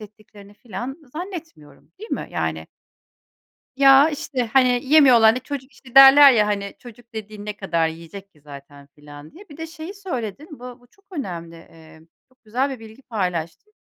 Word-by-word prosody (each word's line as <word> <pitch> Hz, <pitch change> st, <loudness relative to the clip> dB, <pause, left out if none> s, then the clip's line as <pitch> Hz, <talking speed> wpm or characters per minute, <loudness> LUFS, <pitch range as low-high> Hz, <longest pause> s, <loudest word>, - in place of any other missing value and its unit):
ettiklerini 205 Hz, -1 st, -16 dB
falan 245 Hz, -, -8 dB
zannetmiyorum, 325 Hz, -, -10 dB
değil 440 Hz, -, -11 dB
mi? -, -, -4 dB
Yani. -, -, -4 dB, 1.1 s
Ya, 275 Hz, +2 st, +6 dB
işte, 270 Hz, -4 st, -4 dB
hani, 250 Hz, -2 st, +3 dB
yemiyorlar, 260 Hz, -6 st, +6 dB
hani, 250 Hz, -, -4 dB
çocuk 275 Hz, 0 st, -8 dB
işte 255 Hz, 0 st, -19 dB
derler 270 Hz, +1 st, +9 dB
ya, 210 Hz, -3 st, +2 dB
hani, 200 Hz, -1 st, -3 dB
çocuk 240 Hz, -1 st, -16 dB
dediğin 215 Hz, -1 st, -9 dB
ne 210 Hz, 0 st, -6 dB
kadar 170 Hz, -4 st, -1 dB
yiyecek 170 Hz, +5 st, -10 dB
ki 150 Hz, -, -27 dB
zaten 140 Hz, -1 st, -14 dB
falan 145 Hz, 0 st, -13 dB
diye. 380 Hz, +3 st, -16 dB
Bir 290 Hz, -, -13 dB
de 325 Hz, 0 st, -7 dB
şeyi 320 Hz, +4 st, -9 dB
söyledin, 300 Hz, -, -6 dB
bu 250 Hz, 0 st, -10 dB
bu 245 Hz, -, -24 dB
çok 395 Hz, +9 st, -32 dB
önemli, 170 Hz, -, -7 dB
eee, 160 Hz, -1 st, -17 dB, 0.3 s
çok 255 Hz, -1 st, -34 dB
güzel 250 Hz, +6 st, -2 dB
bir 260 Hz, -3 st, -7 dB
bilgi 220 Hz, +3 st, -14 dB
paylaştın: 185 Hz, -, -5 dB
235 Hz, 170 wpm, -21 LUFS, 190-275 Hz, 1.1 s, derler